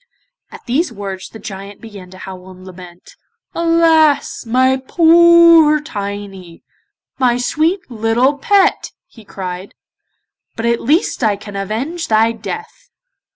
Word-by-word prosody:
At - - -14
these 265 +5 -1
words 195 -3 -7
the - - -12
Giant 200 -1 -9
began 200 -5 -12
to 185 - -14
howl 185 0 -10
and 185 0 -14
lament. 180 -1 -14 0.4
'Alas, 330 -6 +2
my 260 +3 +2
poor 335 -2 +5
Tiny, 200 - -8 0.6
my 245 -2 +2
sweet 320 +9 0
little 240 +4 0
pet,' 395 +5 +1
he 225 - -18
cried, 185 -1 -8 0.8
'but 225 - -4
at 235 0 0
least 295 0 0
I 215 -2 +2
can 205 0 -11
avenge 250 - -4
thy 220 +1 +2
death. 435 - -9
230 Hz, 125 wpm, -16 LUFS, 195-315 Hz, 0.8 s, poor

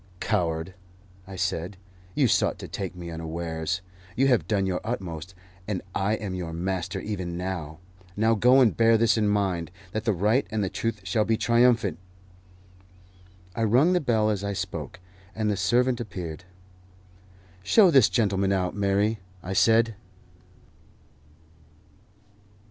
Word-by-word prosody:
"Coward," 85 +1 -1 0.5
I 95 - -8
said, 90 +1 -2 0.4
"you 140 -4 +3
sought - - +2
to - - -8
take 95 -2 -5
me 85 -1 -7
unawares. 80 +2 -4 0.3
You 135 - +2
have 110 - +2
done 100 -2 +1
your 95 -1 -1
utmost, 95 -6 -5 0.3
and 100 -4 -3
I 100 +2 0
am 105 -4 -5
your 90 -3 -5
master, 95 +2 -3
even 90 -4 -4
now. 90 -4 -4 0.4
Now 110 +2 +3
go, 125 +5 +5
and 120 -4 +4
bear 115 0 +4
this 115 0 +3
in 110 -2 +1
mind, 95 -5 0 0.2
that 110 +1 -4
the 110 - +3
right 105 +8 +1
and 110 -2 -1
the 95 - -2
truth 115 -3 -3
shall 105 +4 +1
be 110 +1 +1
triumphant." 115 -8 +3 1.6
I 115 - -1
rung 130 - +4
the 180 - +2
bell 110 -5 +2
as 100 -2 -3
I 100 0 -2
spoke, 90 -3 -5 0.4
and 110 -1 0
the - - 0
servant 120 +6 +1
appeared. 90 -6 -7 1.2
"Show 180 - +5
this 135 -7 +6
gentleman 100 -4 +1
out, 90 -2 0
Mary," 100 +2 +1 0.2
I 95 - -4
said. 115 +3 +4
100 Hz, 145 wpm, -26 LUFS, 90-115 Hz, 1.6 s, this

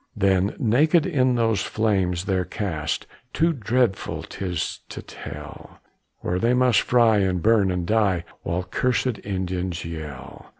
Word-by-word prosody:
Then 95 0 +2
naked 150 +8 +3
in 130 -8 +2
those 115 -4 +1
flames 95 -5 0
they're 95 -2 +1
cast, 85 -6 -3 0.3
Too 165 +1 +2
dreadful 120 -4 0
'tis 90 -2 -4
to - - -7
tell, - - -10 0.4
Where 90 +1 -1
they 120 +4 +2
must 125 -5 +4
fry, 115 -4 +4
and 95 -2 +1
burn 105 0 +3
and 90 -1 -1
die, 100 -4 +2 0.2
While 85 +2 -2
cursed 125 +4 0
Indians 90 -3 -3
yell. 80 -5 -8
100 Hz, 135 wpm, -24 LUFS, 90-120 Hz, 0.4 s, must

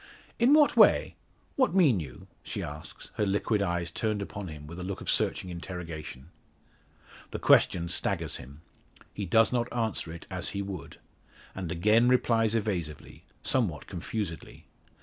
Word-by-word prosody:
"In 250 +5 +6
what 300 -2 +5
way? - - +5 0.4
What 260 -8 +2
mean 145 - +5
you?" 65 -6 -8 0.2
she - - -5
asks, 75 +1 -9
her 105 - +2
liquid 100 +2 +1
eyes 85 -2 -1
turned 110 -2 -1
upon 100 0 -7
him 75 -2 -9
with 85 +4 -9
a - - -5
look 95 +1 -4
of - - 0
searching 90 - 0
interrogation. 85 -4 -7 1.0
The - - -4
question 85 -1 +4
staggers 85 - -1
him. 70 +5 -12 0.5
He 100 -2 -4
does 115 +6 +4
not 120 -1 0
answer 110 -8 -2
it 85 - -9
as - - -2
he 100 - -1
would, 95 -3 -7 0.6
and 90 -4 -5
again 105 +8 +4
replies 115 -3 +3
evasively 90 -9 -3 0.2
somewhat 105 - 0
confusedly. 90 -1 -5
95 Hz, 150 wpm, -29 LUFS, 85-110 Hz, 1.0 s, In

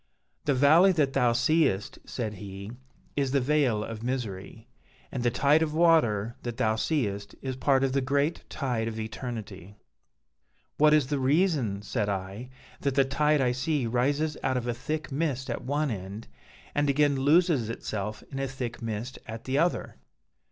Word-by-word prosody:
'The 145 - +2
valley 160 +8 +6
that 145 -6 +1
thou 120 -1 +3
seest,' 120 -6 +1
said 110 -4 -4
he, 100 +1 -8 0.4
'is 140 -2 0
the 140 - +4
Vale 130 -5 +2
of 110 0 -6
Misery, 115 -3 -4 0.4
and 130 - -3
the 120 - +2
Tide 140 +6 +3
of 155 -1 -1
Water 120 -10 +3
that 120 -2 -5
thou 110 0 +2
seest 105 -6 -2
is 130 -1 -3
part 135 0 +2
of 135 -1 +1
the 135 - +2
great 140 +5 0
Tide 120 -6 -2
of 110 -1 -4
Eternity,' 110 -4 -6 1.0
'What 150 0 +6
is 150 -3 +3
the 140 +1 -1
reason,' 135 - +1
said 105 -1 -1
I, 100 +5 -4 0.3
'that 140 -1 -1
the 135 -1 +4
tide 150 +2 +2
I 125 -2 +2
see 130 +2 -1
rises 140 +6 0
out 130 -1 0
of 120 - -3
a 120 - -1
thick 155 +6 -4
mist 135 -3 -1
at - - -4
one 145 +1 0
end, 100 +2 -6 0.5
and 145 0 +1
again 145 0 +3
loses 145 -3 +3
itself 105 -2 -4
in 135 - -4
a 135 - -1
thick 125 -3 -5
mist 115 +3 -4
at 115 0 -7
the 135 +2 0
other?' 175 +2 0
130 Hz, 175 wpm, -28 LUFS, 110-145 Hz, 1.0 s, valley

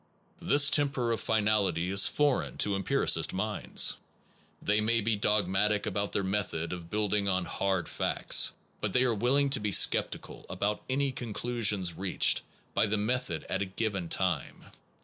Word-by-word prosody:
This 145 0 +4
temper 135 -5 +1
of 115 - -2
finality 100 -5 0
is 95 0 +6
foreign 145 -3 0
to 100 -1 +1
empiricist 95 - +1
minds. 105 +2 +1 0.6
They 105 +1 +1
may 115 +2 +1
be 110 0 0
dogmatic 105 0 +1
about 100 +1 -2
their 100 - -1
method 95 -4 -3
of 85 -2 -8
building 105 -1 0
on 95 -1 0
hard 95 -2 -2
facts/ - - +2 0.3
but - - -3
they 125 - +3
are 125 -2 +1
willing 135 +6 +1
to 140 - +2
be 105 -1 -2
sceptical - - +1
about 105 +1 -2
any 135 +1 0
conclusions 110 -6 -1
reached 95 +2 +2 0.3
by - - +2
the 105 +1 -1
method 105 - -2
at 95 - -2
a - - 0
given 95 -3 -3
time. 90 -6 -2
105 Hz, 155 wpm, -29 LUFS, 95-115 Hz, 0.6 s, is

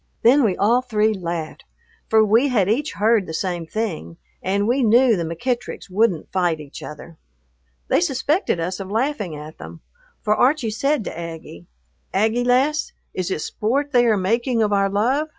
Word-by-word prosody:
Then 260 +5 +6
we 200 -5 +1
all 235 +5 +3
three 220 -3 +1
laughed, 170 -4 -5 0.5
for 220 0 +5
we 225 +6 +4
had 220 -8 +2
each 255 +8 0
heard 215 -1 +2
the 160 - -5
same 175 -2 -3
thing, 165 - -4 0.2
and 200 +2 0
we 255 +4 +2
knew 240 +1 +5
the 175 - -2
McEttricks 195 +5 -4
wouldn't 195 -4 +1
fight 175 -4 0
each 150 -2 -10
other. 155 +2 -10 0.7
They - - +2
suspected 295 - 0
us 180 +3 -3
of 195 -1 -6
laughing 225 - -1
at 150 +1 -10
them, 165 - -10 0.4
for 210 -1 +2
Archie 255 -3 +2
said 275 +3 0
to - - -6
Aggie, 165 - -8 0.5
"Aggie, 220 +4 +2
lass, 265 +5 +1 0.2
is 185 -1 -3
it 170 - -2
sport 275 - -1
they 245 -2 +4
are 220 -2 +3
making 230 +5 +1
of 210 -1 0
our 195 0 +2
love?" 255 +10 0
215 Hz, 175 wpm, -21 LUFS, 180-245 Hz, 0.7 s, Then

